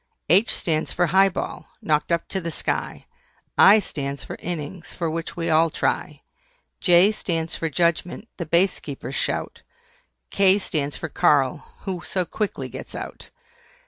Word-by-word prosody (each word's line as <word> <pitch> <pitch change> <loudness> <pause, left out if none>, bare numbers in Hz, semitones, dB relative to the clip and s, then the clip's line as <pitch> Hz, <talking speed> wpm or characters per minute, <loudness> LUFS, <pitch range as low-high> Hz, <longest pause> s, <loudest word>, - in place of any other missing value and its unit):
H 195 +7 +5
stands 155 -2 -1
for 175 - +2
HIGH 190 +4 +5
BALL, - - -5
knocked 150 +1 0
up 170 0 0
to 190 - -2
the 170 - -3
sky. 160 - -3 0.5
I 205 +2 +8
stands 140 -8 -3
for - - -7
INNINGS, 170 0 -6
for 165 -2 -2
which 165 +1 -5
we 165 - -2
all 160 +1 +4
try. - - -2 0.6
J 180 +3 +5
stands 165 -6 -2
for 165 - -2
JUDGEMENT, 170 +5 0
the 170 - -4
Base 175 +4 +3
Keeper's 140 -2 -7
shout. - - -2 0.7
K 195 0 +5
stands 150 -7 -2
for - - -4
KARL, 140 -3 +2 0.2
who 185 -3 -4
so 185 0 -2
quickly 210 +3 -3
gets - - -8
out. - - -8
170 Hz, 155 wpm, -23 LUFS, 155-185 Hz, 0.7 s, I